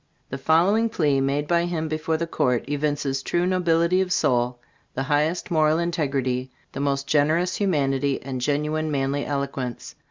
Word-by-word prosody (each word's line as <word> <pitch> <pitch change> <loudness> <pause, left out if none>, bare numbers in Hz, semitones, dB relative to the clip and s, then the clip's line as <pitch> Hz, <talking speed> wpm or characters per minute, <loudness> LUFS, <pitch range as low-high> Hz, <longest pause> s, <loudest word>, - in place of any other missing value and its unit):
The 135 - -4
following 185 +10 +3
Plea, 145 -9 +1
made 140 +2 0
by 170 +1 +2
him 165 -2 -2
before 155 +1 -1
the 170 - -2
Court, 125 -7 0
evinces 145 -2 -1
true 175 +5 0
nobility 180 0 +2
of 185 -1 -2
soul, 125 -6 +1 0.4
the 135 - -1
highest 155 +8 0
moral 155 -1 +3
integrity, 135 -7 -1 0.2
the - - -6
most 140 -1 0
generous 155 +5 +2
humanity, 140 -7 0
and 130 -1 -5
genuine 150 +3 0
manly 140 0 -1
eloquence. 140 -4 -4
150 Hz, 155 wpm, -24 LUFS, 135-165 Hz, 0.4 s, following